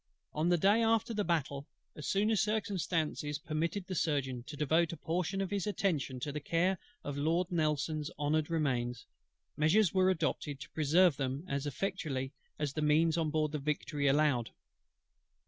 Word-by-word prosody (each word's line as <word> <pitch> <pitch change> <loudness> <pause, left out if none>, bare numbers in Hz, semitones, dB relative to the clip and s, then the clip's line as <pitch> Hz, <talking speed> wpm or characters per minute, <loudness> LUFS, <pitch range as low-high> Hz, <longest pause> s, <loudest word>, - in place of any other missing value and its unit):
On 155 +3 +1
the 175 - +4
day 200 +6 +4
after 225 0 +2
the 210 -1 0
battle, 145 -5 -1 0.3
as 150 - -6
soon 205 +3 +2
as 210 -5 +3
circumstances 175 -8 -1
permitted 165 +5 -2
the 185 - -5
Surgeon 140 -7 0
to 150 -1 -7
devote 160 +3 +2
a 170 - -6
portion 180 +3 -1
of 195 - -3
his 200 -1 -1
attention 155 -11 -1
to 145 - -2
the 150 - -3
care 170 +5 +1 0.2
of 145 -1 -4
Lord 170 +5 +1
NELSON'S 155 -2 0
honoured 150 +1 0
Remains, 125 -7 -1 0.5
measures 165 +5 +3
were 185 -1 +4
adopted 155 -5 -1
to - - -9
preserve 160 +1 +4
them 135 +3 -2
as 140 +1 -2
effectually 145 -4 -2 0.3
as 150 -2 -2
the 155 - -2
means 155 +2 +4
then 165 0 +1
on - - -1
board 155 -1 0
the 150 - -2
Victory 145 0 -1
allowed. 140 -4 +3
155 Hz, 175 wpm, -33 LUFS, 145-180 Hz, 0.5 s, the